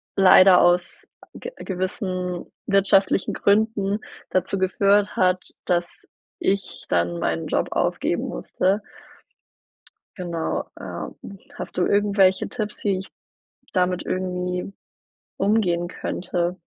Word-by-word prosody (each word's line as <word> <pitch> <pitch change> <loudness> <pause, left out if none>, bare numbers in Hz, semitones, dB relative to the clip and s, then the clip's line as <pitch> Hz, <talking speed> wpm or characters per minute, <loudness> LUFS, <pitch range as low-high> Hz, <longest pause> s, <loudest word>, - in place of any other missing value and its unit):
leider 185 -1 +7
aus 175 0 +1 0.3
ge 485 - -7
gewissen 185 -1 -3 0.2
wirtschaftlichen 195 -1 +3
Gründen 205 -1 +2 0.3
dazu 185 +1 0
geführt 200 +2 +2
hat, 185 0 +2 0.2
dass 175 -1 +1 0.5
ich 195 0 -2
dann 85 0 +1
meinen 80 -1 -1
Job - - 0
aufgeben - - 0
musste. 190 - -1 1.4
Genau, 170 -4 -2
ähm. - - -6 0.4
Hast - - -7
du 180 - +3
irgendwelche 200 -2 +3
Tipps, 215 -3 -4
die 195 -3 +1
ich 190 - -8 0.6
damit 180 -1 +1
irgendwie 180 0 -2 0.7
umgehen 190 -4 +1
könnte? 175 0 -3
185 Hz, 100 wpm, -23 LUFS, 180-200 Hz, 1.4 s, leider